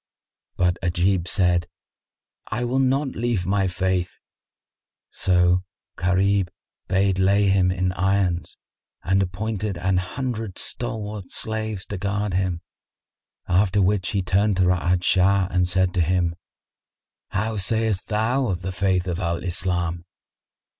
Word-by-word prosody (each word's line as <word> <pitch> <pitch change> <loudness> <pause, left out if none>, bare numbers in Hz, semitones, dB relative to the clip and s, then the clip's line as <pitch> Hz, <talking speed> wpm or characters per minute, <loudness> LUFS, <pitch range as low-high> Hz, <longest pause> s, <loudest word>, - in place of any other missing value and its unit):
But 90 0 +2
Ajib 90 0 +1
said, 85 -1 +2 0.8
"I 120 +3 -2
will 125 +2 0
not 135 +2 +2
leave 115 -7 -1
my 95 +1 +1
faith." 90 -1 -1 0.9
So 90 0 +2 0.3
Gharib 95 +1 +1 0.4
bade 95 0 +1
lay 100 +1 +3
him 95 -1 +3
in 90 0 0
irons 95 -2 0 0.5
and 95 +2 +2
appointed 100 +1 -3
an 90 +1 +1
hundred 110 +2 -3
stalwart 105 -5 -3
slaves 110 -3 -2
to 100 - -6
guard 105 0 -1
him; 90 -2 -1 0.9
after 95 +2 +2
which 95 -1 +2
he 100 -2 0
turned 100 +2 +2
to 95 - +3
Ra'ad 90 0 +2
Shah 95 +1 +3
and 90 0 +1
said 95 0 +2
to 90 - +1
him, 85 0 +1 1.0
"How 110 +2 -2
sayst 110 0 0
thou 115 +5 +1
of 90 -3 -3
the 95 - -3
faith 90 -1 0
of 90 0 -2
Al 85 -3 -1
Islam?" 90 -1 -2
95 Hz, 130 wpm, -23 LUFS, 90-105 Hz, 1.0 s, lay